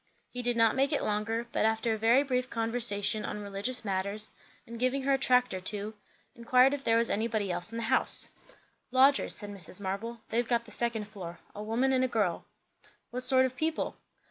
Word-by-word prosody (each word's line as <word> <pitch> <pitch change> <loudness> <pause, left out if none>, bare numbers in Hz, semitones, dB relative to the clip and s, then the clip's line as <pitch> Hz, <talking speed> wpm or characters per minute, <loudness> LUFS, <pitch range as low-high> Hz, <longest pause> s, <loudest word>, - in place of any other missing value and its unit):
He 250 - -4
did 245 -1 +1
not 225 -1 +4
make 275 +2 +2
it 295 - 0
longer; 225 +3 -1
but - - 0
after 220 +1 +1
a - - -2
very 235 +5 +4
brief 255 -2 -1
conversation 225 -2 0
on 210 - -4
religious 205 +5 -3
matters, 200 +2 -2 0.3
and 230 0 -9
giving 255 +2 +1
her 275 +1 +2
a - - +3
tract 250 -3 +3
or 185 - -3
two, 205 +3 -5 0.4
inquired 250 +3 +4
if 285 -1 -4
there 230 -2 +3
was 230 0 +1
anybody 215 -2 -1
else 175 +3 -3
in 230 - -5
the 230 - -2
house? 260 +4 +2 0.6
"Lodgers," 265 +2 +4
said 205 -1 -3
Mrs. 185 -2 -2
Marble. 205 +4 -4
"They've 235 +1 0
got 235 -1 +1
the - - -13
second 235 -3 -1
floor. 180 -5 -8 0.2
A 205 - -7
woman 235 +5 +1
and 260 0 +3
a - - +2
girl." 205 -8 -1 0.7
"What 250 +1 -4
sort 260 0 +5
of 260 0 -4
people?" 315 +4 -1
230 Hz, 205 wpm, -30 LUFS, 210-255 Hz, 0.7 s, sort